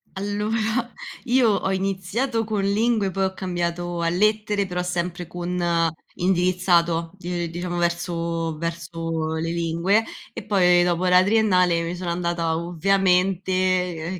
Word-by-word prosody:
Allora, 215 +4 -1 0.3
io 245 -3 +4
ho 195 -1 0
iniziato 195 +6 -1
con 215 -2 -2
lingue, 210 -1 +1
poi 195 +1 -1
ho 190 0 0
cambiato 175 -1 -3
a 165 - +1
lettere 210 +2 +1
però 180 -1 -3
sempre 175 0 -3
con 175 +1 -4 0.6
indirizzato 175 -2 +1
di 175 -1 -3
ehm, - - -5
diciamo 175 +1 -4
verso 170 -2 -2
verso 165 -1 -3
le 165 +1 -2
lingue 170 +6 +1 0.3
e - - -7
poi 180 -3 +4
dopo 175 +1 0
la 180 0 +6
triennale 185 -5 +3
mi 170 +2 -3
sono 175 -1 -4
andata, 170 -2 -1
ovviamente 185 0 +1
180 Hz, 130 wpm, -23 LUFS, 170-195 Hz, 0.6 s, la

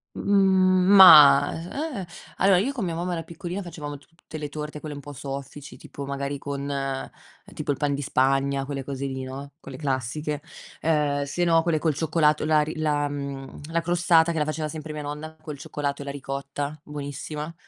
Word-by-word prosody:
Mhmm, 190 -2 +3
ma, 150 -7 +9 0.5
eh, 180 - -8 0.3
allora, 195 -1 +5
io 240 +9 0
con 240 -8 -3
mia 165 -2 -3
mamma, 175 +1 -2
ero 165 - -2
piccolina, 175 +4 -6
facevamo 150 -4 -7
tutte 160 +2 -12
le 150 -1 -4
torte, 150 0 -6
quelle 150 -1 -7
un - - -7
po' 145 +1 -9
soffici, 140 +1 -7
tipo 140 - -9
magari 140 +1 -3
con 140 0 -5 0.9
tipo - - -3
il 140 - +1
pan 145 0 0
di 140 - -3
Spagna, 135 +1 +1
quelle 135 0 -4
cose 140 0 -4
lì, 130 -1 -4
no, 135 +2 -7
quelle 135 -3 -9
classiche. 145 +2 -2 0.4
Ehm, 150 -3 +1
sennò 165 +3 +2
quelle 165 -2 +1
col 155 -1 0
cioccolato, 155 0 +2
la 155 0 +4
ri 155 +1 -4
la, 150 -2 +1
mhmm, 140 -1 -6
la 170 0 +1
crostata 170 -1 +3
che 165 - -2
la 150 - +2
faceva 155 +1 -3
sempre 155 0 -6
mia 150 -1 -5
nonna 150 +2 -6
col 150 -2 -8
cioccolato 140 +1 -4
e - - -7
la 140 - -5
ricotta, 140 +1 -5
buonissima. 150 +2 -6
150 Hz, 185 wpm, -25 LUFS, 140-165 Hz, 0.9 s, ma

